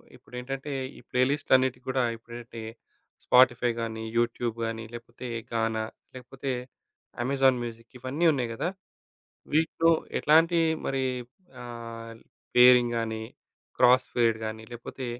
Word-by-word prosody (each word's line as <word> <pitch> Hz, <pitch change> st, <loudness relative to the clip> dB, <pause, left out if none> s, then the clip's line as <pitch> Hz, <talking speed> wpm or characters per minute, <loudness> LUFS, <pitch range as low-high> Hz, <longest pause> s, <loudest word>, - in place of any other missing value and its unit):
ఇప్పుడేంటంటే 135 Hz, +3 st, -6 dB, 0.3 s
ఈ -, -, -11 dB
ప్లే 125 Hz, -, +1 dB
లిస్ట్‌లన్నిటి 130 Hz, -3 st, +2 dB
‌గుడా 130 Hz, -1 st, +1 dB
ఇప్పుడంటే 115 Hz, 0 st, -10 dB, 0.6 s
స్పాటిఫైగాని 120 Hz, -3 st, +3 dB
యూట్యూబ్ 120 Hz, -1 st, 0 dB
గాని 115 Hz, 0 st, -4 dB
లేపోతే 120 Hz, +1 st, -8 dB, 0.3 s
గానా 110 Hz, -1 st, 0 dB, 0.3 s
లేకపోతే 130 Hz, +2 st, -6 dB, 0.7 s
అమెజాన్ 135 Hz, -1 st, +3 dB
మ్యూజిక్ 115 Hz, 0 st, -8 dB
ఇవన్నీ 135 Hz, +7 st, -1 dB
ఉన్నాయి‌ 120 Hz, -4 st, -2 dB
గ‌దా! 140 Hz, +9 st, -2 dB, 0.9 s
వీటిలో 165 Hz, +1 st, +3 dB, 0.3 s
ఎట్లాంటి 165 Hz, +3 st, +5 dB, 0.3 s
మరి 135 Hz, -1 st, 0 dB, 0.6 s
ఆహ్, 115 Hz, -1 st, -8 dB, 0.4 s
పేరింగ్‌గాని 120 Hz, -3 st, +5 dB, 0.6 s
క్రాస్ 125 Hz, +1 st, +5 dB
ఫేర్డ్ 115 Hz, -2 st, +3 dB
గాని 110 Hz, 0 st, -6 dB
లేకపోతే 120 Hz, +2 st, -7 dB
120 Hz, 105 wpm, -27 LUFS, 115-130 Hz, 0.9 s, ఎట్లాంటి